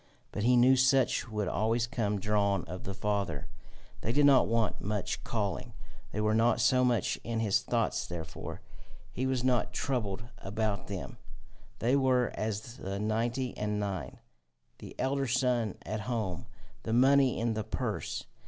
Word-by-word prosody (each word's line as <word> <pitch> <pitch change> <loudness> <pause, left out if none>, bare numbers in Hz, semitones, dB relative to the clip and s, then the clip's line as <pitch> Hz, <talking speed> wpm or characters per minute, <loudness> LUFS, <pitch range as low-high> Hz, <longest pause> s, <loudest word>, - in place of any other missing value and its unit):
But - - -3
he 125 +3 +4
knew 125 +2 +6
such 130 -1 +3
would 105 -3 -2
always 115 +4 +1
come 105 -4 -1
drawn 100 -1 +1
of 90 - -7
the 95 - -4
Father; 100 -7 -1 0.6
they 115 - -1
did 145 +3 +4
not 135 -3 +6
want 115 -1 0
much 105 -1 -2
calling; 100 -6 -2 0.4
they 105 - -3
were 110 0 +2
not 115 +2 +3
so 130 -1 +4
much 120 -5 +1
in 115 -1 -2
his 105 -3 +2
thoughts - - 0
therefore; 85 -1 -6 0.5
he 130 +2 -2
was 130 -2 0
not 125 -2 +1
troubled 110 -7 -2 0.2
about 105 0 -2
them; - - -6 0.6
they 125 +4 +2
were 130 -3 +3
as 110 +3 -4
the 95 -4 -4
ninety 115 +4 -1
and 105 0 -2
nine, 95 -11 -4 0.6
the - - -10
elder 135 0 0
son 125 -4 +1
at 110 +3 -3
home, 105 -7 -3 0.3
the 110 - -3
money 135 +1 +5
in 115 0 0
the 110 0 -2
purse. - - -3
110 Hz, 160 wpm, -30 LUFS, 105-125 Hz, 0.6 s, knew